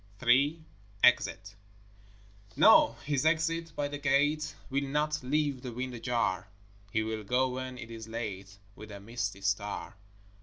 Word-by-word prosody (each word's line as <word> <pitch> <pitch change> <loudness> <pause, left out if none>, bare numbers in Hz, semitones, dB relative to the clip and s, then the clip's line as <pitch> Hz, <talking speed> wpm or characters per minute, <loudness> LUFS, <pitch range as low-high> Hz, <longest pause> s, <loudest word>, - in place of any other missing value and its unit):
III 140 +7 +4 0.4
Exit 100 -5 +3 1.0
No, 115 - +6
his 145 -2 0
exit 165 +1 +1
by 145 - -1
the 145 0 -6
gate 145 +2 +1 0.2
Will 140 +1 +1
not 150 +2 -1
leave 140 0 0
the 125 - -6
wind 125 +2 -4
ajar; 115 -6 -1 0.4
He 110 +2 0
will 110 -1 -4
go 125 +5 +1
when 130 0 -5
it 115 -2 -9
is 115 -1 -8
late 100 -4 -6 0.2
With 110 - -11
a 100 - -8
misty 105 -2 -4
star. 100 +1 -2
125 Hz, 145 wpm, -30 LUFS, 110-145 Hz, 1.0 s, No